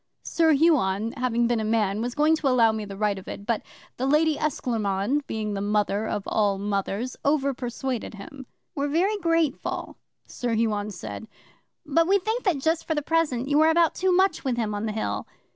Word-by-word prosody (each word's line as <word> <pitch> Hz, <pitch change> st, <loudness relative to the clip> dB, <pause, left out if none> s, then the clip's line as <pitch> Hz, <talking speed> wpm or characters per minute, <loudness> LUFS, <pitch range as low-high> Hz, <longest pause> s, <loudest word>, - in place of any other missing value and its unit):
'Sir 325 Hz, -2 st, +3 dB
Huon, 230 Hz, -, +2 dB
having 245 Hz, -2 st, 0 dB
been 235 Hz, -1 st, +1 dB
a -, -, -1 dB
man, 215 Hz, -2 st, +1 dB
was 245 Hz, +1 st, -3 dB
going 305 Hz, +2 st, +4 dB
to 310 Hz, -3 st, -2 dB
allow 240 Hz, -4 st, +4 dB
me 220 Hz, -1 st, -4 dB
the 200 Hz, -1 st, -8 dB
right 205 Hz, -1 st, 0 dB
of 185 Hz, -, -15 dB
it, 200 Hz, -, -7 dB
but 230 Hz, -1 st, 0 dB, 0.4 s
the 260 Hz, -, -1 dB
Lady 305 Hz, +2 st, +3 dB
Esclairmonde, 235 Hz, -4 st, -1 dB
being 215 Hz, -1 st, -3 dB
the 195 Hz, -, -3 dB
Mother 210 Hz, +1 st, 0 dB
of 205 Hz, -, -2 dB
all 205 Hz, -2 st, +1 dB
Mothers, 200 Hz, +4 st, -2 dB
over 280 Hz, -1 st, +2 dB
persuaded 245 Hz, -2 st, -4 dB
him. 255 Hz, +6 st, -10 dB, 0.3 s
'"We're 285 Hz, -1 st, -1 dB
very 365 Hz, +8 st, +1 dB
grateful," 330 Hz, -5 st, -1 dB, 0.3 s
Sir 240 Hz, -2 st, -2 dB
Huon 215 Hz, -2 st, 0 dB
said, 165 Hz, -, -7 dB, 0.6 s
"but 330 Hz, +3 st, +2 dB
we 395 Hz, +2 st, +5 dB
think 440 Hz, +6 st, -2 dB
that 365 Hz, -7 st, +2 dB
just 320 Hz, +4 st, 0 dB
for 320 Hz, -, 0 dB
the 295 Hz, -, -1 dB
present 290 Hz, -6 st, 0 dB
you 290 Hz, +1 st, +3 dB
are 315 Hz, -, +5 dB
about 330 Hz, 0 st, +3 dB
too 375 Hz, 0 st, +1 dB
much 375 Hz, -1 st, +2 dB
with 255 Hz, -3 st, -1 dB
him 220 Hz, -3 st, -1 dB
on 205 Hz, +2 st, -2 dB
the -, -, -2 dB
Hill." 215 Hz, +1 st, -3 dB
245 Hz, 200 wpm, -25 LUFS, 210-310 Hz, 0.6 s, we